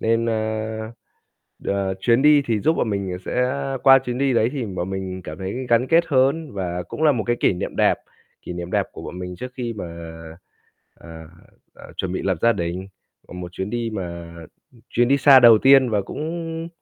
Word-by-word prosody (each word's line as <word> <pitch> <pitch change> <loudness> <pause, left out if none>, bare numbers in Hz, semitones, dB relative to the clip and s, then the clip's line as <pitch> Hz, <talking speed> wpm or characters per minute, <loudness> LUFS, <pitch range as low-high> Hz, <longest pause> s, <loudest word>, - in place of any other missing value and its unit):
nên, 115 +1 +1
ơ, 110 -1 -2 0.9
ờ, 100 -1 -1
chuyến 120 +5 +3
đi 150 -1 +6
thì 110 -3 0
giúp 160 +9 +2
bọn 110 - 0
mình 95 -3 -3
sẽ 125 0 0 0.3
qua 135 -1 +8
chuyến 125 -1 -4
đi 135 -1 +1
đấy 115 0 +2
thì 135 -5 -3
bọn 95 -2 -4
mình 95 -1 -5
cảm 75 - -8
thấy 100 +7 -5
gắn 120 +2 +3
kết 165 +3 +4
hơn 140 +2 +1
và 90 -2 -3
cũng 155 - -4
là 150 - +6
một 120 -5 -1
cái 120 0 0
kỷ - - +3
niệm 90 - -5
đẹp, - - +3 0.5
kỷ - - -7
niệm 90 0 -6
đẹp - - +1
của - - -10
bọn 90 - -8
mình 90 0 -6
trước 125 +4 -7
khi 120 -2 -3
mà, 100 -5 -6 1.1
ờ, - - -16 0.7
ờ, - - -14
chuẩn 95 -1 -3
bị - - -2
lập 95 -3 0
gia 115 - +5
đình. 90 0 -4 0.4
Ờ, - - -12
một 90 -1 -7
chuyến 95 +2 -4
đi 120 0 -2
mà, 85 -3 -6 0.4
ừm, 120 - -20
chuyến 120 0 +2
đi 140 +2 +3
xa 140 -1 +7
đầu 115 -2 +8
tiên 135 +1 +5
và 105 -2 +1
cũng 165 - -5
115 Hz, 210 wpm, -22 LUFS, 95-130 Hz, 1.1 s, qua